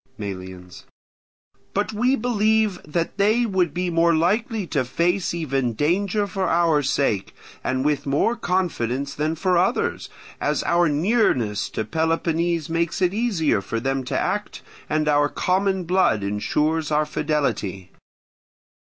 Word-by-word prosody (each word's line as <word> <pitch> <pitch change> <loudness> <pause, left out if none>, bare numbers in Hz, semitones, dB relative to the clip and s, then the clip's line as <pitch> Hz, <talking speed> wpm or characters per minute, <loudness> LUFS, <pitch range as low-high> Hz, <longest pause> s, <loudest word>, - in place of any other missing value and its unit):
Melians. 95 -3 -8 0.9
But 205 +2 0
we 245 +5 +2
believe 220 -5 +1
that 170 +5 -2
they 215 +4 +3
would 185 -6 +1
be 180 +2 -2
more 170 0 +3
likely 210 +6 0
to 145 -5 0
face 175 +8 0
even 135 -7 -1
danger 195 - +1
for 190 -2 -2
our 165 -3 +3
sake, 130 -7 0 0.3
and 130 +1 -1
with 150 -1 0
more 145 +12 +2
confidence 140 - -1
than 155 +2 -1
for 180 +2 +2
others, 190 +7 0 0.3
as - - 0
our 170 -1 +3
nearness 145 - +1
to 110 - -3
Peloponnese 165 +3 0
makes 165 0 -1
it 180 -1 +2
easier 200 - +1
for 115 +3 -3
them 135 +2 -1
to - - -2
act, - - -2 0.3
and 155 0 0
our 145 0 +3
common 190 +2 0
blood 170 - +2
ensures 150 +10 0
our 150 0 +2
fidelity. 115 - -2
165 Hz, 135 wpm, -23 LUFS, 140-190 Hz, 0.9 s, they